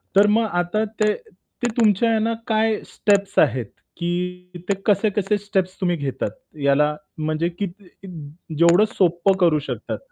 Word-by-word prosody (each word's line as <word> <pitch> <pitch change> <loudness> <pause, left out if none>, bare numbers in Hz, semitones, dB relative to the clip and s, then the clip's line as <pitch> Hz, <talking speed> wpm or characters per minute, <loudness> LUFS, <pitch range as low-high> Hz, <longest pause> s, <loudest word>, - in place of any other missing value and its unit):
तर 205 +1 +6
मग 225 +2 +3 0.2
आता 215 +5 -1
ते 215 0 0 0.5
ते - - +4
तुमच्या 225 0 +3
आहे 225 - +2
ना 225 +1 0
काय 220 -1 +1
स्टेप्स 200 -1 0
आहेत? 120 -2 +2 0.3
की 180 +1 -4
ते 200 - +4
कसे-कसे 205 0 +2
स्टेप्स 195 -2 -2
तुम्ही 175 -1 +1
घेतात? 135 -3 -3 0.3
याला 150 +2 +3 0.2
म्हणजे 155 +2 -1
किती 195 +2 -6 0.2
कित 195 - -10 0.5
जेवढं 170 +5 +5
सोपं 180 +1 +2
करू 165 -4 +4
शकतात. - - -4
190 Hz, 150 wpm, -22 LUFS, 170-210 Hz, 0.5 s, तर